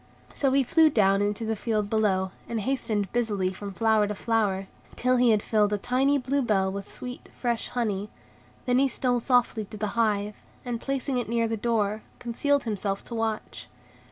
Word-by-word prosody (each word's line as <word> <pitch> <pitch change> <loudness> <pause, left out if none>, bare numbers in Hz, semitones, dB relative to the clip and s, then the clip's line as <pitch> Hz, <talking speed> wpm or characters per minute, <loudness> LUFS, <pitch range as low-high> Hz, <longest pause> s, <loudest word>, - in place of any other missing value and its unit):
So 275 -2 +1
he 275 0 +4
flew 320 +5 +5
down 200 -6 +3
into 205 +2 -1
the 220 0 -1
field 215 -1 -1
below, 195 -3 +1 0.2
and 230 - -1
hastened 215 -5 -1
busily 205 -6 0
from 200 +1 -7
flower 220 0 +2
to 210 - -3
flower, 205 -3 0 0.3
till 255 +1 +2
he 245 -1 +4
had 215 -2 +3
filled 210 -2 +2
a - - +2
tiny 260 +6 +2
blue 275 +2 0
bell 195 -6 +1
with 200 0 -6
sweet, 250 0 -8
fresh 235 -2 -1
honey. 210 -4 -2 0.6
Then 250 0 +3
he 275 - +4
stole 250 -1 0
softly 240 -3 +2
to 215 - -10
the 210 0 -2
hive, 210 -3 0 0.3
and, 240 -1 -3
placing 275 -1 -1
it 240 - -4
near 230 0 +1
the 225 - -1
door, 215 -2 0 0.2
concealed 280 +4 0
himself 200 -3 -2
to - - -9
watch. 225 -1 -3
225 Hz, 185 wpm, -27 LUFS, 205-245 Hz, 0.6 s, flew